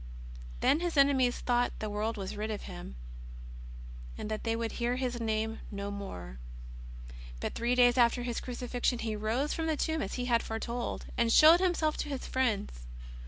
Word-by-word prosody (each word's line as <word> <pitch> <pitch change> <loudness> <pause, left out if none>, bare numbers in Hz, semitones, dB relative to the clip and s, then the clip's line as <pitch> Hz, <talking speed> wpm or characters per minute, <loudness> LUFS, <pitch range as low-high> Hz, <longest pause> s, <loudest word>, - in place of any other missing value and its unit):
Then 300 - +4
His 345 -3 -2
enemies 265 -3 +4
thought 245 0 +1
the 215 - -4
world 215 +2 -2
was 195 -1 -5
rid 215 +1 -3
of 210 -2 -4
Hixn, 175 - -8 1.2
and 215 - -5
that 215 - -3
they 225 -1 0
would 230 0 -2
hear 240 +1 -1
His 250 -2 -2
Name 220 0 -1
no 200 0 -4
more. 90 - -7 1.0
But - - -3
three 240 +2 0
days 245 0 +5
after 240 +1 +4
His 240 -1 -3
Crucifixion 245 0 -1
He 225 -2 -3
rose 225 +8 -1
from 325 0 -2
the 315 -2 0
tomb 315 +1 0
as 195 - -3
He 250 - -2
had 235 -2 +3
foretold, 235 +2 -4
and 235 -1 +3
showed 315 +7 +8
Himself 345 -4 +1
to 300 - -3
His 275 -2 -4
friends. 205 - -1
235 Hz, 180 wpm, -31 LUFS, 215-260 Hz, 1.2 s, showed